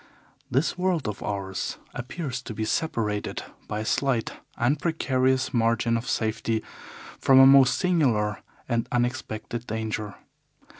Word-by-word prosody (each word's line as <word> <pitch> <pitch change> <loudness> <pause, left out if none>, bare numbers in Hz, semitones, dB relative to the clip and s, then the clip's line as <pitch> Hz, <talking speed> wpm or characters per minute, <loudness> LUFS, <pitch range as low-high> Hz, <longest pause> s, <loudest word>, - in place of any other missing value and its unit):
This 140 +7 0
world 180 -7 +1
of 105 - -4
ours 95 -2 -3 0.2
appears 130 +1 -4
to 115 -4 -7
be 110 - -2
separated 110 -7 -1 0.2
by 105 0 -3
a - - -4
slight 130 -2 0 0.3
and 135 +5 +1
precarious 130 -5 +1
margin 115 0 +2
of 115 +1 -3
safety 110 0 -1 0.6
from 135 -1 +6
a 135 - +10
most 135 -2 +7
singular 125 - +1 0.3
and 115 -2 -1
unexpected 120 -1 -2
danger. 110 -2 -3
120 Hz, 130 wpm, -26 LUFS, 110-135 Hz, 0.6 s, a